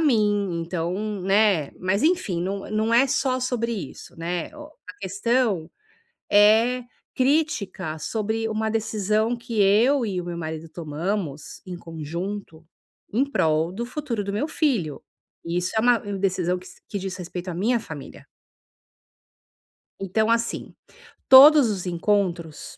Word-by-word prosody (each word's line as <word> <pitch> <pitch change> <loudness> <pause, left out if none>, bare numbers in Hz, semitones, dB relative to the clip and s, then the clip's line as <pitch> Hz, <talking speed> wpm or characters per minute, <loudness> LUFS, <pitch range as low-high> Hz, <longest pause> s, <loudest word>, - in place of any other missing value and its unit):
mim, 205 - +2
então", 170 +1 -3 0.3
né, 195 -5 +3
mas, 190 +3 0
enfim, 310 - +1
não 195 +2 -4
não 220 +1 0
é 270 +4 +6
só 260 0 0
sobre 235 -2 -1
isso, 195 -11 -8
né. 170 +1 -4
O 300 - -9 0.2
a 205 - -8
questão 200 -2 0 0.6
é 220 +5 +5 0.3
crítica 255 - 0
sobre 220 +6 -2
uma 220 0 -1
decisão 220 +1 0
que 235 -2 -3
eu 235 +7 +4
e 190 -4 -2
o - - -7
meu 175 -1 -5
marido 160 -1 -5
tomamos 160 0 -4
em 180 -1 -6
conjunto, 165 +2 -6 0.5
em 245 +6 +3
prol 160 - +1
do 235 +5 -4
futuro 250 -4 -3
do 200 - -3
meu 215 +9 -1
filho. 225 - -1 0.4
E 170 +1 -3
isso 180 +1 -2
é - - +4
uma 240 +1 +4
decisão 185 -3 -1
que 180 - -14
s - - -15
que 205 - -3
diz 190 -1 -5
respeito 180 0 -7
à - - -5
minha 225 +8 +1
família. 155 -9 -10 1.7
Então, 215 +3 0
assim, 230 0 -1 0.5
todos 275 -1 +9
os 195 -3 -3
encontros, 175 -3 -1
200 Hz, 140 wpm, -24 LUFS, 175-230 Hz, 1.7 s, todos